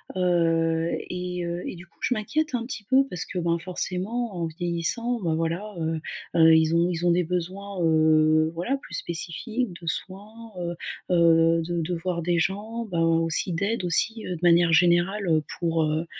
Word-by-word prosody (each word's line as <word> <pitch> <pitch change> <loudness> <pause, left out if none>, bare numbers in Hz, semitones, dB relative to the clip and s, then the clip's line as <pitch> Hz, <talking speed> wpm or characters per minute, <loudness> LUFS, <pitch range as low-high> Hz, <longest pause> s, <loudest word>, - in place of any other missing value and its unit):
heu, 165 -2 +1 0.2
et 180 0 -4
heu, 170 +1 -4
et - - -5
du 175 +1 -11
coup - - -34
je - - +1
m'inquiète 290 +6 -1
un 235 -1 -2
petit 235 -4 -6
peu 265 +5 +4
parce 180 - -4
que, 180 - -4
bah, 170 -1 0
forcément 190 +5 -3
en 170 - -1
vieillissant, 175 +9 -1
ben 165 -3 0
voilà, 170 +6 -3 0.6
heu, 160 -1 +7
ils 160 +1 +3
ont 170 +1 +3
ils 175 -1 -2
ont 175 - +4
des 180 +1 +2
besoins, 185 +3 -4
heu, 155 0 +4
voilà 180 +12 -1
plus - - -9
spécifiques 190 +7 -3
de 170 - -10
soins, 210 +7 -6
heu 175 0 -3 0.4
heu, 165 -1 +4
de 170 +1 -2
de 170 +3 -3
voir 170 0 -3
des 170 +1 +1
gens, 210 +7 -2
bah, 170 -3 -2
aussi 165 +2 +2
d'aide, 200 +5 -1
aussi 215 +6 +1
de 180 - -4
manière 170 -1 +5
générale, 175 +4 +3
heu, 160 -2 +2 0.2
pour, 165 -2 +1
heu, 155 +2 -1
175 Hz, 180 wpm, -25 LUFS, 165-200 Hz, 0.6 s, heu